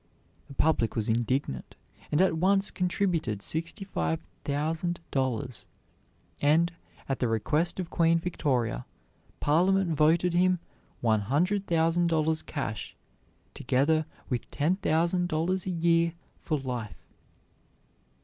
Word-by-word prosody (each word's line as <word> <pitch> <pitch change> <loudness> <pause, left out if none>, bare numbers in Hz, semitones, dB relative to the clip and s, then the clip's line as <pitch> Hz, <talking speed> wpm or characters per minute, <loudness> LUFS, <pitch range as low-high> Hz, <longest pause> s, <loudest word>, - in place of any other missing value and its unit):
The 140 - -11
public 150 -8 +2
was 110 -2 -1
indignant, 115 - -1 0.4
and 150 - +3
at 190 -3 +3
once 195 +4 +2
contributed 170 - -1
sixty 170 +6 -3
five 80 - -1 0.2
thousand 160 +4 -1
dollars; 130 -2 -2 0.7
and, 165 +4 +3 0.3
at 135 - -2
the 125 - +1
request 150 - 0
of 175 -2 -4
Queen 165 -1 +3
Victoria, 130 - -1 0.5
Parliament 180 +4 +3
voted 165 +4 +3
him 180 +1 +3 0.4
one 110 -2 +3
hundred 180 - 0
thousand 165 +1 +2
dollars 160 -1 +1
cash, 135 -8 -5 0.6
together 150 +5 +1 0.2
with 125 -3 -3
ten 160 +6 +1
thousand 175 0 +1
dollars 175 +3 -1
a - - 0
year 170 -1 +2 0.3
for 155 - -1
life. 125 -5 -5
160 Hz, 120 wpm, -28 LUFS, 130-175 Hz, 0.7 s, and